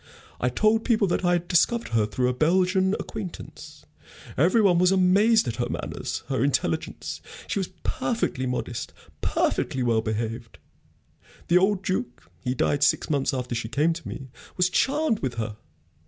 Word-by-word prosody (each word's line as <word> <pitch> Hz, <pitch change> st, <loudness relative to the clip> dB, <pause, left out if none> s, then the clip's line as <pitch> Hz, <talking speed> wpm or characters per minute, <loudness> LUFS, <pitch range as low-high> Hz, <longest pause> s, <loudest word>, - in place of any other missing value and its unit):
I 125 Hz, -, +1 dB
told 215 Hz, -, +2 dB
people 225 Hz, -4 st, +2 dB
that 175 Hz, -, 0 dB
I 175 Hz, 0 st, +3 dB
had 175 Hz, 0 st, -1 dB
discovered 230 Hz, +8 st, +2 dB
her 110 Hz, -2 st, +1 dB
through 125 Hz, +4 st, 0 dB
a 125 Hz, -, +1 dB
Belgian 185 Hz, +6 st, +2 dB
acquaintance. 200 Hz, -6 st, -8 dB, 0.5 s
Every 175 Hz, -, +3 dB
one 190 Hz, -5 st, +4 dB
was 180 Hz, +1 st, +4 dB
amazed 200 Hz, +5 st, +4 dB
at -, -, -3 dB
her -, -, -1 dB
manners, -, -, -4 dB
her -, -, 0 dB
intelligence. -, -, -1 dB, 0.2 s
She 200 Hz, -, -2 dB
was 190 Hz, -, -2 dB, 0.2 s
perfectly 225 Hz, -, -1 dB
modest, 125 Hz, -1 st, -4 dB, 0.3 s
perfectly 130 Hz, -, 0 dB
well 115 Hz, -2 st, +2 dB
behaved. 115 Hz, +1 st, -4 dB, 0.9 s
The 175 Hz, +1 st, +6 dB
old 195 Hz, 0 st, +1 dB
Duke 185 Hz, -, -3 dB
he 125 Hz, +1 st, -1 dB
died 145 Hz, +2 st, +1 dB
six 150 Hz, -, +2 dB
months 140 Hz, -2 st, +1 dB
after 125 Hz, -2 st, -3 dB
she 115 Hz, -1 st, -3 dB
came 150 Hz, +8 st, +2 dB
to 165 Hz, 0 st, -9 dB
me 135 Hz, -1 st, -7 dB, 0.3 s
was 180 Hz, 0 st, +2 dB
charmed 280 Hz, -3 st, +1 dB
with 130 Hz, -3 st, -3 dB
her. 110 Hz, -2 st, -4 dB
170 Hz, 165 wpm, -25 LUFS, 125-195 Hz, 0.9 s, The